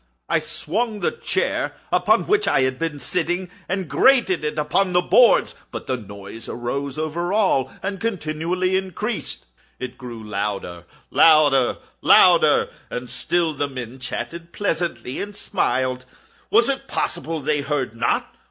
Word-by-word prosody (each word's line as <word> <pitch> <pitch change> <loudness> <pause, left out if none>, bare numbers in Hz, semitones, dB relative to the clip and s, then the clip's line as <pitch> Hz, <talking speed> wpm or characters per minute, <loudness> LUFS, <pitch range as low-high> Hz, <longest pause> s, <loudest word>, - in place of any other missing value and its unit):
I - - +2
swung 215 +4 -2
the - - +1
chair - - -1 0.2
upon - - +3
which 420 0 +2
I 135 - +3
had 130 0 0
been 165 -3 -2
sitting, 180 +3 -1 0.2
and 185 -1 -2
grated 235 - +3
it 150 0 -2
upon 180 +5 +1
the 180 - +4
boards, - - +5 0.2
but - - -7
the 130 - -1
noise 100 -1 -9
arose 135 +4 -3
over 160 +3 -2
all 190 -11 +2
and 195 0 -3
continually 180 -2 -1
increased. 195 +4 -3 0.3
It 130 - -7
grew 120 -3 -8
louder—louder—louder! 105 - +3 0.2
And 125 0 -6
still 165 +6 0
the 145 0 -1
men 130 -1 -7
chatted 170 +6 -6
pleasantly, 170 -9 -2
and 205 0 -6
smiled. 130 -10 -1 0.4
Was 230 +2 +4
it 270 0 -2
possible 165 -1 -2
they 150 0 0
heard 140 -5 -2
not? 115 -1 -1
155 Hz, 135 wpm, -22 LUFS, 130-185 Hz, 0.4 s, boards